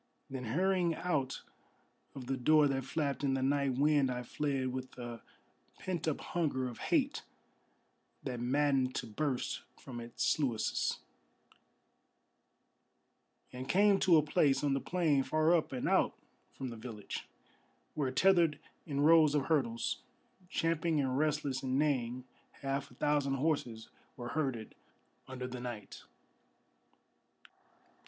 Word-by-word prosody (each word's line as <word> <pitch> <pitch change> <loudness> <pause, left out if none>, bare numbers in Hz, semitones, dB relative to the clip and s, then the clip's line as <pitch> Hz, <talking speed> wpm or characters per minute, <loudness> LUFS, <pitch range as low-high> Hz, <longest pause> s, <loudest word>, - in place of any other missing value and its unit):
Then 130 -2 -4
hurrying 175 +6 +1
out 150 -8 -1 0.7
of 135 -2 -7
the 135 +2 -1
door 150 +4 +5
that 135 -2 -1
flapped 145 0 -2
in 135 -1 +2
the 130 - -1
night 140 -1 +1
wind 145 0 +3
I 125 0 -3
fled, 135 0 -1
With 130 0 -6
a 120 -2 -7 0.6
pent 175 -4 -3
up 155 - -1
hunger 145 -7 -1
of 120 - -8
hate 285 -4 +2 1.0
that 125 -3 -4
maddened 135 +1 +1
to - - -2
burst 130 +4 -2 0.2
from 125 -3 -8
its 115 0 -4
sluices, 125 -8 0 2.5
And 130 +2 -6
came 200 +1 +5
to 175 -3 +6
a 155 - +4
place 145 -1 +2
on 145 -2 +2
the 135 - +1
plain 160 -6 +2
far 155 +4 +2
up 165 - 0
and 130 -2 -2
out - - +2 0.3
from 130 - -6
the 115 - -7
village, 110 -3 -7 0.7
Where 145 -4 0
tethered 170 +2 +4 0.3
in 140 -2 -1
rows 155 -1 +6
of 145 - +2
hurdles, 125 -8 0 0.5
champing 165 -2 +1
and 130 -2 0
restless 145 -2 0
and 130 0 0
neighing, 130 -4 0 0.4
Half 140 +1 -2
a 125 - -17
thousand 145 -1 +1
horses 130 -6 -1 0.3
were 120 -1 -5
herded 130 -8 -2 0.5
under 130 -1 -5
the 125 0 -6
night. 120 -5 -7
135 Hz, 135 wpm, -33 LUFS, 125-155 Hz, 2.5 s, to